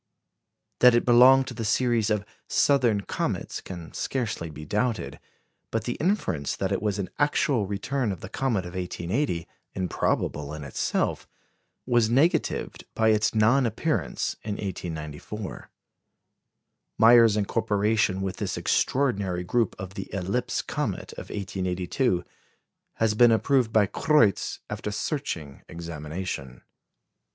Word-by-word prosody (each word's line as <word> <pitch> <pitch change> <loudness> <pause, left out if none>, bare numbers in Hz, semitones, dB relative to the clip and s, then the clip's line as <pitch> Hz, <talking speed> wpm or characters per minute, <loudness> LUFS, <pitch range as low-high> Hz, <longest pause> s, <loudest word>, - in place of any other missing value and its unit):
That 125 -1 +7
it 120 - +2
belonged 125 +2 +7
to - - -7
the 115 - -5
series 115 0 +2
of 105 -1 0 0.2
"southern 120 -8 +3
comets" - - -3
can 85 -3 -9
scarcely 110 -10 -3
be 75 0 -9
doubted; 105 - -1 0.5
but - - -2
the - - -2
inference 95 - 0
that - - -2
it - - 0
was 105 -1 -1
an 100 -2 -4
actual 140 -6 +2
return 110 +4 -1
of 95 - -6
the - - -6
comet 110 -3 -1
of 90 - -8
1880, 90 - -2 0.3
improbable 75 -5 -1
in 75 - -7
itself, 70 - -1 0.6
was 120 -3 +3
negatived 140 +9 +1
by 110 0 +3
its 110 +1 +2
non 120 +4 +4
appearance 150 +8 -2
in 105 - -4
1894. 90 +1 -6 1.3
Meyer's 115 -1 +7
incorporation 105 -1 +1
with 95 -1 -3
this - - -3
extraordinary 100 -10 0
group 115 +4 0
of 95 +1 -7
the 95 - -7
"eclipse 100 +6 -2
comet" - - -3
of - - -9
1882 95 +1 -1 0.7
has 110 -1 +1
been 120 +2 +6
approved 120 +1 +2
by 110 -2 +4
Kreutz, 115 -1 +2
after - - -4
searching 100 - -4
examination. 80 -5 -6
105 Hz, 125 wpm, -26 LUFS, 90-120 Hz, 1.3 s, That